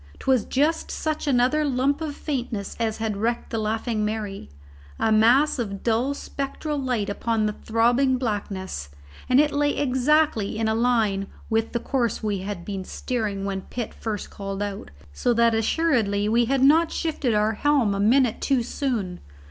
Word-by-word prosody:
'Twas 260 -5 +1
just 300 +5 0
such 310 -1 -3
another 260 +3 +3
lump 280 +1 +1
of 300 -3 -3
faintness 240 -10 -4
as 225 -2 -1
had 220 -2 -2
wrecked 235 +3 -2
the 225 - -1
Laughing 220 +1 -1
Mary, 210 - -4 0.5
a 220 - +1
mass 245 +7 +4
of 200 -4 -4
dull 240 +5 +1
spectral 280 +2 -4
light 250 -6 -1
upon 220 +2 0
the 210 - 0
throbbing 240 +5 +2
blackness, 195 - -4 0.4
and 255 +1 +5
it 300 0 +4
lay 290 0 +1
exactly 260 -5 +2
in 225 0 0
a 220 - +2
line 220 -4 +1 0.2
with 225 0 +1
the 235 - -1
course 240 -3 -1
we 205 -2 -1
had 190 -2 -5
been 195 -2 -4
steering 210 -2 -3
when 195 -1 -2
Pitt 235 +3 -6
first 215 -3 -5
called 195 0 -4
out, 205 -1 -5 0.2
so 240 - +1
that 230 0 +4
assuredly 225 -4 +1
we 235 +2 +3
had 265 +2 +1
not 320 +4 +5
shifted 295 -8 -1
our 210 +1 +2
helm 265 -4 +2
a 195 - -2
minute 240 +3 +3
too 265 -4 +1
soon. 230 -8 -2
230 Hz, 170 wpm, -24 LUFS, 210-270 Hz, 0.5 s, and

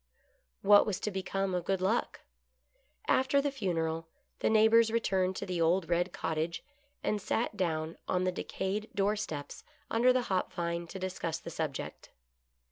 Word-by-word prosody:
What 205 +1 +7
was 205 - -1
to 210 - -1
become 190 0 -2
of 180 -1 -1
Good 195 -1 +1
Luck? 195 +6 0 0.9
After 265 +2 +3
the 285 0 0
funeral 165 -9 -2 0.3
the - - +2
neighbors 220 +1 +6
returned 190 -5 +1
to - - -4
the 180 -3 -2
old 170 +1 +2
red 175 +1 +1
cottage, 160 +1 -2 0.4
and 210 -1 0
sat 225 +2 -1
down 160 -4 -2
on 180 0 +1
the 185 - +1
decayed 195 +3 -3
door 205 +1 +2
steps 150 -8 -5 0.3
under 240 +3 +5
the 255 0 +2
hop 190 -5 -1
vine 170 0 -2
to 190 - -7
discuss 185 -3 -3
the 170 - -8
subject. 155 -4 -4
190 Hz, 160 wpm, -31 LUFS, 170-215 Hz, 0.9 s, What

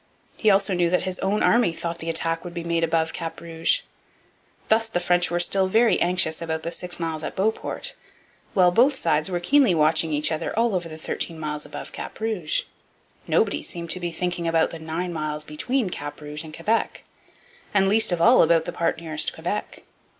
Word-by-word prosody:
He 215 - +2
also 195 0 +3
knew 175 -1 +2
that 180 - +1
his 185 -1 -2
own 200 +2 0
army 235 -7 +4
thought 170 0 -4
the 165 - -4
attack 165 0 0
would 175 -1 -8
be 170 - -4
made 170 0 0
above 160 0 +1
Cap 165 -1 -5
Rouge. 165 - 0 0.9
Thus 225 +1 +3
the 200 -5 -1
French 175 -1 +2
were 175 +1 0
still 190 +2 +2
very 225 +4 +3
anxious 175 -2 +1
about 160 -1 -3
the 170 - -3
six 180 0 -2
miles 160 -2 -2
at - - -5
Beauport, 220 - -2 0.6
while 180 -2 +5
both 255 +9 +4
sides 155 -5 +1
were 175 -1 -1
keenly 250 +1 +4
watching 160 +1 +3
each 150 +1 +1
other 160 +6 -3
all 230 -1 +2
over 175 -3 -2
the 155 - -8
thirteen 165 +1 -4
miles 150 -1 -4
above - - -8
Cap - - -7
Rouge. 215 -8 -1 0.6
Nobody 75 - +1
seemed 170 - -3
to 185 - -1
be 175 -1 -3
thinking 175 0 -2
about 165 -1 +2
the 165 - -7
nine 165 +3 -4
miles 155 -1 -3
between 190 - -1
Cap 145 - -6
Rouge 150 +1 -6
and 155 -1 -10
Quebec, 215 +8 -1 0.7
and 195 -1 +3
least 215 0 +3
of 175 - 0
all 235 +9 +6
about 165 0 +4
the 175 - -4
part 170 -1 -1
nearest 155 -2 -1
Quebec. - - -4
170 Hz, 200 wpm, -24 LUFS, 160-190 Hz, 0.9 s, all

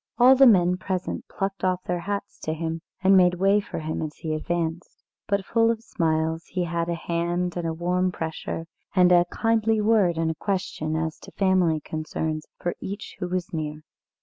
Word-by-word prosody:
All 250 +2 +8
the 270 0 +7
men 180 -5 +5
present 185 -1 -3
plucked 195 0 -4
off 185 -1 +1
their 180 0 -2
hats 200 +3 -4
to 155 - -3
him, 165 0 -3 0.2
and 195 +1 +6
made 180 -1 +5
way 195 +3 +3
for 205 - -6
him 160 0 -3
as 155 -1 -4
he 160 -1 -4
advanced. 165 +1 -3 0.2
But, 200 -1 0
full 230 0 +3
of 230 -1 -1
smiles, 160 -4 -1
he 180 -1 -2
had 170 0 -2
a 170 - 0
hand 170 +1 -1
and 175 -2 -2
a 165 - -1
warm 180 +2 0
pressure, 160 0 -4 0.3
and 180 -1 +6
a 175 0 +6
kindly 225 +2 +1
word 210 -6 +3
and 165 0 +1
a - - -3
question 160 -3 -2
as 160 0 -2
to - - -13
family 185 -5 +2
concerns, 155 0 -4
for 175 - -2
each 200 +2 -7
who 180 - -2
was 180 0 -3
near. 155 -1 -4
175 Hz, 195 wpm, -25 LUFS, 160-195 Hz, 0.3 s, All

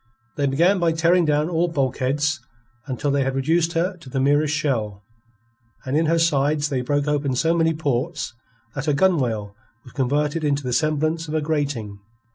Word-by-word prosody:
They 140 -1 0
began 170 +8 +3
by 170 -2 +2
tearing 170 +2 +3
down 150 0 +1
all 170 0 +1
bulkheads, 145 0 0 0.5
until 140 +2 -2
they 140 0 +1
had 135 0 -2
reduced 165 +5 +1
her 180 +3 -1
to 165 -6 -13
the 135 - -2
merest 145 +2 +2
shell, 110 -9 -2 0.8
and 130 +2 -2
in 160 +1 +2
her 165 +1 +2
sides 150 -2 +1
they 135 -3 -1
broke 145 +3 -1
open 145 -3 0
so 165 +6 +2
many 165 -1 +2
ports 145 0 -2 0.4
that 135 0 -4
her 150 - +2
gunwale 125 - +1 0.3
was 125 - -15
converted 145 +4 0
into 145 -1 0
the 125 -1 -2
semblance 155 +4 0
of 155 - -4
a 155 - +1
grating. 140 -10 -2
145 Hz, 180 wpm, -22 LUFS, 135-160 Hz, 0.8 s, began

